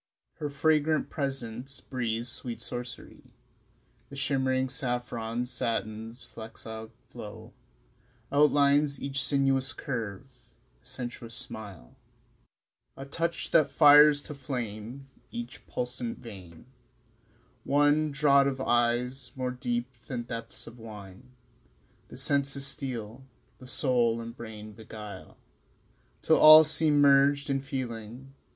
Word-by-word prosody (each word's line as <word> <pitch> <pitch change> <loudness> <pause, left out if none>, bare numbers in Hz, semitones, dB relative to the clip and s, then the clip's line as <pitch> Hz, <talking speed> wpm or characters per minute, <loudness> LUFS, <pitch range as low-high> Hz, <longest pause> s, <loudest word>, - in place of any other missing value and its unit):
Her 150 - -3
fragrant 155 +1 +1
presence 135 -2 -4
breathes 120 -3 -3
sweet 120 -2 -2
sorcery; 120 +1 -7 0.9
The 140 - -10
shimmering 130 -2 +1
saffron 120 -2 -2
satin's 115 -1 -4
flexile 110 0 -8 0.2
flow 105 -4 -10 0.8
Outlines 145 -1 +3
each 140 0 -2
sinuous 135 -1 +2
curve; 120 0 -6 0.3
a - - -30
sensuous 120 -3 -5
smile, 100 - -6 1.0
A 135 - -7
touch 165 +4 -3
that 155 -3 +4
fires 150 -1 +7
to 150 - -8
flame 125 -2 -6 0.2
each 120 +1 -8
pulsant 125 -1 -4
vein 95 -8 -12 1.0
One 145 +2 +3
draught 140 -1 +4
of 135 -1 -2
eyes 125 +1 +1
more 130 -1 -2
deep 120 -1 -2 0.2
than 125 -5 -4
depths 115 -1 -6
of 115 +1 -12
wine 105 +1 -11 0.8
The - - -11
senses 140 0 +2
steal, 130 -4 -1 0.4
the 130 - -12
soul 125 -3 +1
and 115 0 -7
brain 110 -3 -9
beguile 105 -3 -10 0.9
Till - - +4
all 155 +1 +10
seem 155 -1 +3
merged 140 +1 +4
in 135 0 0
feeling 130 -1 -6
125 Hz, 110 wpm, -28 LUFS, 115-140 Hz, 1.0 s, all